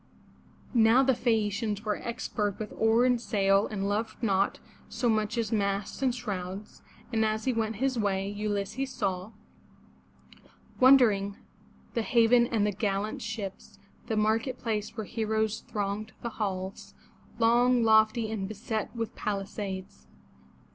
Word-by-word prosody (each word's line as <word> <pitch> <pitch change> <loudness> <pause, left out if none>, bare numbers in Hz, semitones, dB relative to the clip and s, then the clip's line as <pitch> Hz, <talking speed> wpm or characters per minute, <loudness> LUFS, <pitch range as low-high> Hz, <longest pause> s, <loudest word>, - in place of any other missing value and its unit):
Now 235 +2 +5
the 265 0 +4
Phae 230 -3 +1
a' - - 0
ci 200 +3 -3
ans 210 +1 -3
were 210 -1 0
expert 210 -4 -3
with 215 -1 -6
oar 225 +2 +3
and 250 -2 +2
sail 195 -2 +2
and 200 -2 -3
loved 215 +3 -2
naught 195 -2 +2 0.3
so 240 +2 -1
much 215 0 +1
as 230 -1 -1
masts 200 +1 -1
and 255 -2 +2
shrouds, 200 -4 -6 0.3
and 220 -1 +2
as 215 0 -1
he 260 - +2
went 225 -1 -1
his 260 +2 0
way, 195 -2 0
Ulysses 205 +5 -2
saw 190 -5 -2 0.8
— - - -25
Wondering^ 220 -7 +5 0.6
the 230 - 0
haven 235 +1 +4
and 220 -4 +1
the 210 - +1
gallant 205 +1 -2
ships. 210 -3 -6 0.3
The 220 -2 -1
market 225 +4 +1
place 220 -2 -3
where 220 - -3
heroes 220 0 -1
thronged 210 +1 -4
the 235 - -2
halls, 195 -3 -4 0.4
Longy 240 +1 +4
lofty, 220 0 +4
and 200 -3 -3
beset 215 +2 -4
with 230 -1 -4
palisades. 195 - -5
215 Hz, 150 wpm, -29 LUFS, 200-230 Hz, 0.8 s, Now